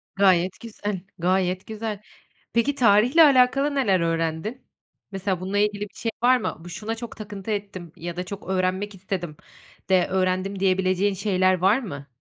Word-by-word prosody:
Gayet 185 -2 +3
güzel, 210 -4 -5 0.2
gayet 185 +1 0
güzel. 220 -2 -5 0.5
Peki, 250 +5 +2
tarihle 240 +6 +5
alakalı 275 0 +4
neler 200 -10 +2
öğrendin? 165 +7 -2 0.5
Mesela, 195 -2 -2
bununla 190 +2 -2
ilgili 205 0 +1
bir 205 -1 -6
şey 230 - -3
var 255 +1 +6
mı? 220 - -3
Bu, 175 - -9
şuna 210 +6 -4
çok 230 0 -8
takıntı 205 -1 -7
ettim 200 -5 -5
ya 175 +1 -6
da 180 - -3
çok 200 +1 -8
öğrenmek 190 +2 -1
istedim 180 -4 -5 0.5
de 185 -2 +4
öğrendim 185 +1 0
diyebileceğin 190 +1 +2
şeyler 185 -1 +2
var 195 +7 +4
mı? 140 - -7
195 Hz, 155 wpm, -24 LUFS, 185-215 Hz, 0.5 s, var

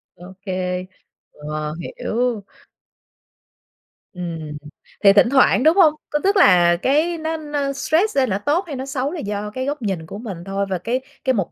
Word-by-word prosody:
Ô 180 +2 -12
kê. 185 -1 -2 0.5
Ờ, 150 0 -5
hiểu. 235 +3 -2 1.7
Ừm, 165 -4 -6 0.5
thì 195 -1 +8
thỉnh 210 +4 +5
thoảng, 265 -1 +4
đúng 315 +2 +5
hông? 320 -5 +6 0.2
Có 295 - 0
tức 395 +1 +3
là 175 - +6
cái 315 +5 +2
nó 320 0 -3
nó 295 -2 -3
stress 330 +7 +1
lên 260 -2 +3
là 190 - 0
nó 205 - -13
tốt 330 +6 +2
hay 290 - -5
nó 265 +1 -5
xấu 275 +1 -2
là 350 - -5
do 210 -3 -4
cái 260 +4 -4
góc 285 -1 -3
nhìn 190 -6 -3
của 200 - -8
mình 210 -5 -6
thôi. 195 +1 -2
Và 185 - -1
cái 235 +8 -2 0.2
cái 260 - +2
mục 195 -7 -2
235 Hz, 190 wpm, -21 LUFS, 185-290 Hz, 1.7 s, thì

